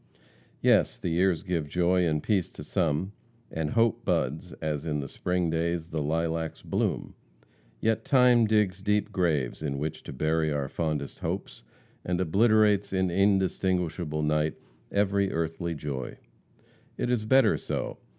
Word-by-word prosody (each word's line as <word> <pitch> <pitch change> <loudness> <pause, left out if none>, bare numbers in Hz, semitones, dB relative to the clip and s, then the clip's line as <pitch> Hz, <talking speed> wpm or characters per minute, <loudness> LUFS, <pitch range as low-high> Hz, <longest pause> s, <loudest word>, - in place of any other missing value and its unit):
Yes, - - +4
the - - -3
years 85 0 +2
give 85 -6 -2
joy 90 +1 +2
and 75 -2 0
peace 100 -5 +1
to - - -9
some, 80 +5 0 0.4
and 80 -2 -2
hope 115 +1 +2
buds, 75 +7 -1
as 75 -2 -3
in 75 -2 -2
the 70 - -4
spring 90 +3 -1
days 85 0 -1
the 80 -2 -2
lilacs 80 +1 -2
bloom. - - -1 0.7
Yet 110 - +1
time 125 -4 +5
digs 105 -3 +1
deep 105 +1 0
graves 80 -11 0
in 70 -3 -2
which 75 +2 -4
to - - -6
bury 80 +3 0
our 70 -2 -1
fondest 75 -4 -3
hopes, - - -4 0.4
and 90 0 -1
obliterates 105 +2 +3
in 95 -2 +1
indistinguishable 90 -4 +1
night 75 0 +1 0.4
every 100 -1 +1
earthly 85 +1 -2
joy. 70 -4 -5 0.8
It 120 - -1
is 120 -3 +1
better 130 +5 +4
so. - - -4
85 Hz, 145 wpm, -28 LUFS, 75-100 Hz, 0.8 s, time